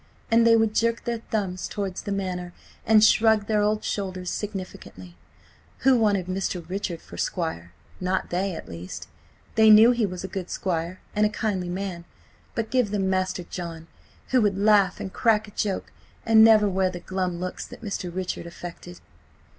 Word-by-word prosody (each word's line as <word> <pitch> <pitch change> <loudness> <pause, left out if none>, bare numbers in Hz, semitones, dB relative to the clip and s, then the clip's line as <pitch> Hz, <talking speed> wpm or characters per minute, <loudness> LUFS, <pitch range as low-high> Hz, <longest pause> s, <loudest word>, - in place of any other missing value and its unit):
And 230 0 +5
they 230 - +7
would 225 -1 +2
jerk 230 +1 +1
their 235 -1 -2
thumbs 190 -4 -2
towards 195 -3 -4
the 205 - -5
Manor 180 -3 -3 0.3
and 215 0 +6
shrug 220 -1 +5
their 210 0 +1
old 210 +1 +1
shoulders 185 -3 -3
significantly. 185 - -7 0.7
Who 265 0 +5
wanted 205 -5 +2
Mr. 185 -2 -3
Richard 180 -2 -3
for - - -11
squire? 125 - -3 0.3
Not 185 +1 -1
they, 185 +1 -1
at - - -8
least. 85 +2 -8 0.5
They 220 0 +6
knew 220 +3 +8
he 235 -4 +1
was 180 -1 -6
a - - -3
good 190 -2 -5
squire 175 0 -3 0.2
and 210 - +3
a 210 - +4
kindly 200 -5 -2
man, 180 -2 -4 0.5
but 225 -1 -3
give 250 -5 +2
them 195 -2 0
Master 185 -1 -1
John, 170 -2 -7 0.4
who 255 -1 +3
would 205 -3 +1
laugh 200 -2 +4
and 190 - -6
crack 220 -2 +2
a - - -12
joke 200 -1 -2 0.3
and 220 -1 +7
never 220 -2 +6
wear 190 -1 +1
the 180 -1 -7
glum 185 -1 -3
looks 185 0 -5
that - - -12
Mr. 195 -4 -4
Richard 180 -1 -4
affected. 175 +1 -10
195 Hz, 180 wpm, -25 LUFS, 180-215 Hz, 0.7 s, knew